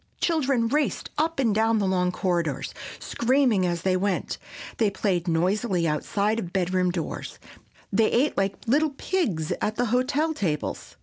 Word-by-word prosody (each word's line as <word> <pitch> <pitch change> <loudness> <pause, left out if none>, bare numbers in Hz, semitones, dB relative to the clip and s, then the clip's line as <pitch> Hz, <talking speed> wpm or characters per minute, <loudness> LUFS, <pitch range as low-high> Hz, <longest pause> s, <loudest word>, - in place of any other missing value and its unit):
Children 275 -8 +1
raced 295 +4 -1
up 325 +2 0
and 235 -6 +2
down 225 +1 +3
the 205 - +1
long 180 -1 +1
corridors, 170 -7 -1 0.2
screaming 240 -6 +2
as 170 -1 -2
they 185 -1 +2
went; 190 0 -1 0.4
they 220 -3 +3
played 190 -3 -1
noisily 180 +2 +1
outside 200 +8 0
of 175 -6 -5
bedroom 185 -1 +1
doors; 175 -3 -4 0.6
they 220 +2 +4
ate 270 +5 +2
like 195 0 0
little 285 +4 +2
pigs 210 - -1
at 215 - 0
the 245 - +1
hotel 285 +6 +1
tables. 160 - -3
205 Hz, 150 wpm, -25 LUFS, 180-255 Hz, 0.6 s, they